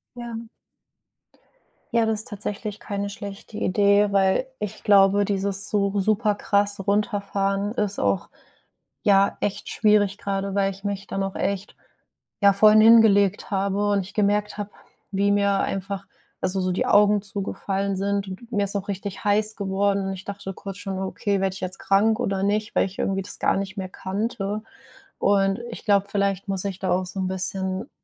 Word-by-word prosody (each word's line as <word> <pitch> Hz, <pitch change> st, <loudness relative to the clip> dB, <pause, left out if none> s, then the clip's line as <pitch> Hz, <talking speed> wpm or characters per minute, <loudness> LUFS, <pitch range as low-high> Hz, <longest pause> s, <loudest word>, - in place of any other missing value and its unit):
Ja. 235 Hz, -1 st, -7 dB, 1.4 s
Ja, 230 Hz, -1 st, +3 dB
das 220 Hz, -1 st, 0 dB
ist -, -, -4 dB
tatsächlich 205 Hz, 0 st, -5 dB
keine 200 Hz, 0 st, -3 dB
schlechte 200 Hz, +1 st, -8 dB
Idee, 200 Hz, +1 st, +3 dB
weil 195 Hz, +5 st, +2 dB
ich 210 Hz, -2 st, -6 dB
glaube, 200 Hz, -1 st, +5 dB
dieses 195 Hz, -1 st, -1 dB
so 200 Hz, -1 st, +1 dB
super 215 Hz, +1 st, +2 dB
krass 200 Hz, 0 st, +1 dB
Runterfahren 200 Hz, -1 st, 0 dB
ist 210 Hz, -4 st, -2 dB
auch, 100 Hz, -2 st, 0 dB, 0.8 s
ja, 200 Hz, -1 st, +4 dB
echt 200 Hz, -, -3 dB
schwierig, 210 Hz, -2 st, +3 dB
grade, 195 Hz, 0 st, -3 dB
weil 195 Hz, 0 st, +1 dB
ich 195 Hz, 0 st, -13 dB
mich 200 Hz, -1 st, -3 dB
dann 195 Hz, -, -2 dB
auch 195 Hz, 0 st, -4 dB
echt, 200 Hz, 0 st, -3 dB, 0.6 s
ja, 200 Hz, 0 st, +7 dB
vorhin 215 Hz, +2 st, +6 dB
hingelegt 215 Hz, -3 st, +5 dB
habe 200 Hz, +1 st, 0 dB
und 200 Hz, -1 st, +2 dB
ich 190 Hz, +2 st, -10 dB
gemerkt 210 Hz, 0 st, +1 dB
habe, 205 Hz, -1 st, -4 dB, 0.4 s
wie 200 Hz, +1 st, +2 dB
mir 200 Hz, -1 st, +2 dB
einfach, 195 Hz, 0 st, -3 dB, 0.4 s
also 190 Hz, +1 st, 0 dB
so 185 Hz, 0 st, 0 dB
die -, -, 0 dB
Augen 205 Hz, 0 st, +5 dB
zugefallen 195 Hz, 0 st, -3 dB
sind 200 Hz, +1 st, -1 dB
und 210 Hz, +6 st, -9 dB
mir 205 Hz, -3 st, +1 dB
ist 200 Hz, -, -4 dB
auch 200 Hz, 0 st, -3 dB
richtig 195 Hz, 0 st, -5 dB
heiß 210 Hz, +1 st, +2 dB
geworden 200 Hz, 0 st, 0 dB
und 195 Hz, -, -2 dB
ich 190 Hz, 0 st, -9 dB
dachte 200 Hz, -1 st, -6 dB
kurz 195 Hz, 0 st, -8 dB
schon: 195 Hz, -1 st, -5 dB
„Okay, 195 Hz, +1 st, -1 dB
werde 190 Hz, -1 st, 0 dB
ich 195 Hz, -, -8 dB
jetzt 185 Hz, 0 st, -5 dB
krank 215 Hz, +3 st, +2 dB
oder 195 Hz, -5 st, -1 dB
nicht?“, 210 Hz, +1 st, 0 dB
weil -, -, +4 dB
ich 195 Hz, 0 st, -9 dB
irgendwie 195 Hz, 0 st, 0 dB
das 205 Hz, -, -5 dB
gar -, -, +2 dB
nicht 195 Hz, 0 st, -4 dB
mehr 190 Hz, -1 st, -4 dB
kannte. 205 Hz, +2 st, -3 dB, 0.6 s
Und 195 Hz, 0 st, +2 dB
ich -, -, -9 dB
glaube, 200 Hz, -1 st, +3 dB
vielleicht 200 Hz, -1 st, -1 dB
muss 195 Hz, 0 st, -2 dB
ich 195 Hz, -2 st, -4 dB
da 190 Hz, -, -1 dB
auch 185 Hz, +1 st, +1 dB
so 185 Hz, +2 st, -5 dB
'n 185 Hz, -, -1 dB
bisschen, 190 Hz, +3 st, -2 dB
200 Hz, 180 wpm, -24 LUFS, 195-205 Hz, 1.4 s, ja